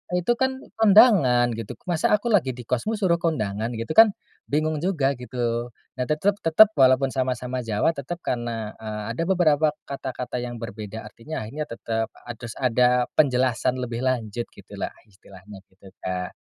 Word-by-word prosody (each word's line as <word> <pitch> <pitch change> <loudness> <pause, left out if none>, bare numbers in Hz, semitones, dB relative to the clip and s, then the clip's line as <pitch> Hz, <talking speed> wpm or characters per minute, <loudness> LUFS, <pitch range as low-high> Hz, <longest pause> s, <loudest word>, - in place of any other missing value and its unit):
itu 180 +6 +1
kan 265 0 +1 0.2
kondangan," 190 - +6
gitu, 115 -2 -6
"Masa 175 +3 +2
aku 225 +3 -2
lagi 135 - +2
di 125 - -9
kosmu 125 - -1
suruh 180 -5 +1
kondangan?" 115 -8 -2
gitu 115 +6 -4
kan, 225 +7 +8 0.4
bingung 155 +1 0
juga 145 -7 0
gitu. 120 -1 -2 0.3
Nah 125 - 0
tetep 195 +7 +1
tetep 200 +7 +6
walaupun 130 0 +5
sama-sama 130 -1 -2
Jawa, 115 +5 +1
tetap 170 +4 -7
karena, 115 -3 -3
eee, 110 -1 -5
ada 125 - -2
beberapa 160 -5 +3 0.2
kata-kata 130 -2 -5
yang 120 0 -5
berbeda 110 0 -7
artinya 135 +3 -6
akhirnya 150 +8 -5
tetap 115 -1 -3 0.2
harus 120 -1 -8
ada 125 0 +3 0.2
penjelasan 130 -2 +2
lebih 120 -1 -4
lanjut 120 -3 -2
gitulah - - -7
istilahnya, 100 -1 -15
gitu 95 0 -17
Kak. 90 -1 -4
125 Hz, 155 wpm, -24 LUFS, 115-155 Hz, 0.4 s, kan